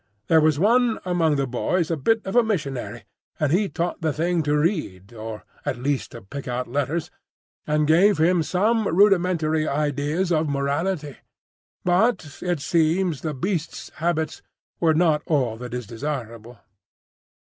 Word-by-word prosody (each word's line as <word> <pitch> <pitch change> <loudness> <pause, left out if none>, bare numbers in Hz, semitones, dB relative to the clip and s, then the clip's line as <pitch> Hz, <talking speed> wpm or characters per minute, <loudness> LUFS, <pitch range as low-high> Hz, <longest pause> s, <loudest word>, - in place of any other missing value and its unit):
There 160 -1 +6
was 155 -1 +3
one 230 +6 +3
among 170 -4 +2
the 140 -1 0
boys 160 +7 -1
a - - +2
bit 220 +10 +1
of 190 - -4
a 245 - +7
missionary, 140 - -3 0.4
and 150 -3 +1
he 195 +4 +2
taught 175 0 -3
the 160 -1 +1
thing 170 +3 0
to 150 -1 +1
read, 150 - -2
or 110 -1 -7 0.2
at 125 - -2
least 135 +2 -2
to 115 - -9
pick 140 +9 -8
out 125 0 -2
letters, 145 +5 -2 0.6
and 150 0 +2
gave 175 +6 +4
him 170 +2 +3
some 210 +6 +1
rudimentary 170 -5 +3
ideas 150 +5 -1
of 155 -2 +1
morality; 145 +2 -2 0.7
but 180 - +1
it 175 -5 -1
seems 165 0 +1
the 155 -3 -3
beast's 175 +2 -3
habits 160 -2 -1 0.4
were 160 -2 +3
not 160 -2 +3
all 130 -8 +1
that 125 +1 -8
is 125 -1 -4
desirable. 115 -2 -6
155 Hz, 155 wpm, -23 LUFS, 140-180 Hz, 0.7 s, a